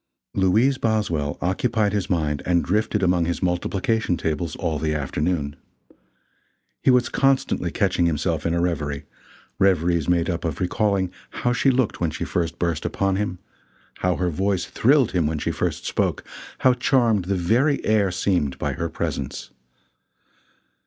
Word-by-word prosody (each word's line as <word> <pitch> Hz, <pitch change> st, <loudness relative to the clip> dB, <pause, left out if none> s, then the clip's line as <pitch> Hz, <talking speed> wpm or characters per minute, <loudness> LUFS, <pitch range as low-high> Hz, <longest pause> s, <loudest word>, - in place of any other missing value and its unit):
Louise 110 Hz, +9 st, +3 dB
Boswell 85 Hz, -10 st, 0 dB
occupied 105 Hz, +3 st, 0 dB
his 100 Hz, -3 st, -1 dB
mind 75 Hz, -5 st, 0 dB
and 85 Hz, -1 st, +2 dB
drifted 105 Hz, +1 st, 0 dB
among 90 Hz, -2 st, +2 dB
his 85 Hz, +2 st, -2 dB
multiplication 95 Hz, +2 st, 0 dB
tables 80 Hz, +1 st, -2 dB
all 80 Hz, -5 st, -2 dB
the 75 Hz, -1 st, -1 dB
afternoon. 75 Hz, +1 st, -2 dB, 1.3 s
He -, -, +2 dB
was 125 Hz, -1 st, +4 dB
constantly 135 Hz, -9 st, +1 dB
catching 90 Hz, -2 st, +1 dB
himself 80 Hz, 0 st, -1 dB
in 85 Hz, 0 st, 0 dB
a -, -, +1 dB
reverie 75 Hz, -5 st, -2 dB, 0.5 s
reveries 85 Hz, -4 st, +2 dB
made 85 Hz, -1 st, +2 dB
up 85 Hz, -3 st, -2 dB
of 80 Hz, -4 st, -3 dB
recalling 95 Hz, 0 st, 0 dB, 0.3 s
how 120 Hz, -, +3 dB
she 135 Hz, -, +2 dB
looked 130 Hz, -7 st, 0 dB
when 85 Hz, -, +2 dB
she -, -, -4 dB
first 85 Hz, -2 st, -2 dB
burst 85 Hz, -3 st, -1 dB
upon 95 Hz, -1 st, 0 dB
him; 100 Hz, -3 st, -2 dB, 0.6 s
how 90 Hz, -1 st, +1 dB
her 90 Hz, -1 st, -1 dB
voice 95 Hz, +2 st, 0 dB
thrilled 135 Hz, 0 st, +3 dB
him 85 Hz, -5 st, +1 dB
when 80 Hz, 0 st, -1 dB
she -, -, -1 dB
first -, -, -2 dB
spoke; -, -, -1 dB, 0.4 s
how 130 Hz, -, +5 dB
charmed 115 Hz, -7 st, +2 dB
the 100 Hz, +1 st, 0 dB
very 120 Hz, -, +1 dB
air 105 Hz, -3 st, +3 dB
seemed 90 Hz, -7 st, 0 dB
by -, -, -2 dB
her -, -, -3 dB
presence. 70 Hz, -2 st, -4 dB
90 Hz, 155 wpm, -23 LUFS, 85-105 Hz, 1.3 s, how